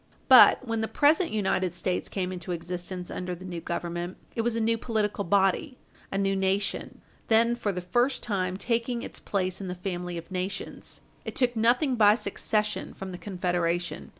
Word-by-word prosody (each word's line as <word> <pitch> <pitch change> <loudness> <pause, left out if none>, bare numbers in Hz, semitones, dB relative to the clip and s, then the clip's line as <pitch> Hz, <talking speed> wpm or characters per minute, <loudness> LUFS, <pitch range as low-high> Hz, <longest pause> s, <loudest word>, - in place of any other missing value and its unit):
But, - - +8
when 225 -1 -1
the 220 - 0
present 310 +8 +3
United 190 -4 0
States 180 0 -2
came 185 -2 -2
into 180 -1 -4
existence 180 +1 -5
under 180 0 -4
the 185 +2 -11
new 175 -2 -5
Government, 175 +1 -4 0.2
it 230 - +1
was 230 0 0
a - - 0
new 230 +1 +2
political 215 -3 -1
body, 195 - +2 0.3
a 195 - -1
new 195 0 +1
nation, 195 +1 -1 0.3
then 230 +1 +4
for 220 -4 -1
the 180 -1 -4
first 240 +9 +1
time 185 -4 -1
taking 235 +2 -1
its - - -7
place 185 -1 -2
in 190 - -5
the 180 - -4
family 180 -1 -4
of 170 +2 -9
nations. 185 +1 -4 0.2
It - - -6
took 245 -2 +1
nothing 245 +4 +2
by 210 -1 +7
succession 210 0 -2
from 190 -1 -6
the 180 - -7
Confederation. 175 -3 -2
195 Hz, 180 wpm, -27 LUFS, 180-225 Hz, 0.3 s, But